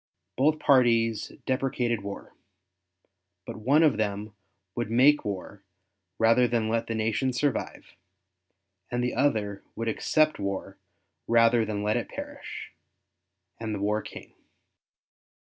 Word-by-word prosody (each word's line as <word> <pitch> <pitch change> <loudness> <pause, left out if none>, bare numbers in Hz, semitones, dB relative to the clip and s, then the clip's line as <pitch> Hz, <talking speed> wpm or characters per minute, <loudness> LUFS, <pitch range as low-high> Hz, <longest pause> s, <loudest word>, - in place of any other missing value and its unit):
Both 150 +4 +3
parties 115 -6 +3
deprecated 125 -4 0
war; 100 0 -8 1.1
but - - -7
one 140 +9 +3
of 150 -9 +4
them 105 0 -2 0.4
would 120 -2 -3
make 135 +6 +5
war 100 0 -6 0.5
rather 115 +2 +4
than 115 -2 0
let 115 0 -1
the 115 - -2
nation 110 +4 0
survive, 135 0 -2 1.0
and 120 0 -1
the 125 - -1
other 110 -7 0
would 115 +1 -4
accept 155 +7 +1
war 100 -1 -4 0.5
rather 115 0 +4
than 105 -1 -3
let 105 +1 +1
it - - -4
perish; - - -8 0.9
and 110 -2 -3
the - - -5
war 105 +2 0
came. - - -11
115 Hz, 125 wpm, -27 LUFS, 105-125 Hz, 1.1 s, make